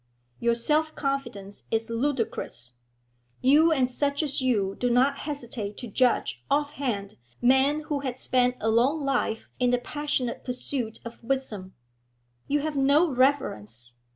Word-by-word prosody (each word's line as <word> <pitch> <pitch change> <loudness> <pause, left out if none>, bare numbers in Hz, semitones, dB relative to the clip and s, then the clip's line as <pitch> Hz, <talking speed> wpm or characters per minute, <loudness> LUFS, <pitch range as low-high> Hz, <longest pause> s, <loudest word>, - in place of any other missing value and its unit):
Your 235 0 +2
self 305 +6 +1
confidence 240 -8 -4
is 225 +1 -1
ludicrous; 230 - -2 0.7
you 300 +5 +5
and 265 -5 +3
such 285 +4 0
as 280 -2 0
you 210 -7 +1
do 245 - +1
not 265 +4 +3
hesitate 235 -7 -5
to 245 - -6
judge 200 - +1
offhand 275 -8 -1 0.2
men 265 +4 +4
who 300 -2 -2
have 260 -3 -4
spent 250 -1 +2
a 220 - +1
long 265 +7 +2
life 250 -5 -1
in 250 -1 +3
the 245 - +3
passionate 265 -2 -2
pursuit 250 -2 -3
of 235 0 -9
wisdom. 230 -7 -3 0.7
You 290 +1 +1
have 305 0 -3
no 285 +4 +4
reverence. 120 - 0
255 Hz, 140 wpm, -27 LUFS, 230-285 Hz, 0.7 s, you